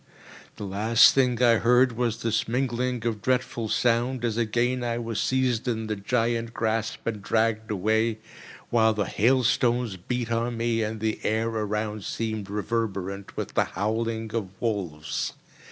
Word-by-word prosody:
The - - -7
last 105 +4 +5
thing 125 -2 +2
I 115 -2 +6
heard 125 +3 +4
was 115 -1 -2
this 115 -1 0
mingling 125 0 -1
of 110 -3 -1
dreadful 125 -2 -1
sound, 120 +2 +1
as 115 -2 0
again 120 +2 0
I 120 -1 -1
was 115 -2 -3
seized 130 -2 +1
in 110 -2 -1
the 110 0 -2
giant 115 +2 -1
grasp 110 0 -1
and 110 -3 -2
dragged 110 +1 0
away, 110 +3 +1 0.5
while 110 -2 +4
the 105 -2 0
hailstones 120 -2 +2
beat 120 +5 -3
on 115 +1 -1
me, 115 0 0
and 110 0 -3
the 110 -1 -1
air 110 +1 0
around 105 -1 -2
seemed 110 -2 -3
reverberant 100 -2 -3
with - - -4
the - - +3
howling 110 +3 -2
of 100 -4 -4
wolves. 90 -10 -2
115 Hz, 155 wpm, -26 LUFS, 110-120 Hz, 0.5 s, I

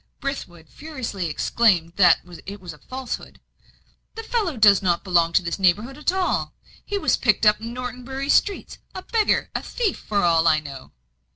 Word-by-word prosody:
Brithwood 180 - -6
furiously 255 - -6
exclaimed 170 +1 +1
that 180 -4 +5 0.3
it 200 +1 -7
was 180 -4 -9
a 150 - -17
falsehood. 260 -1 -7 0.8
"The 450 - -6
fellow 425 - -2
does 205 -3 +6
not 175 -3 0
belong 170 -3 +2
to 185 - +3
this 170 +3 -4
neighbourhood 210 +8 +1
at 300 +4 0
all. 375 -1 -1 0.3
He 410 - -3
was - - +2
picked 215 -3 +2
up 210 0 +4
in 230 +1 -6
Norton 250 0 -6
Bury 270 +2 -5
streets 400 +6 +1 0.2
a 370 - -6
beggar, 445 -2 0
a - - -2
thief, 445 -6 -2
for 205 -2 -1
all 165 -1 +3
I 155 -1 +4
know." 140 -3 -10
215 Hz, 180 wpm, -23 LUFS, 175-275 Hz, 0.8 s, does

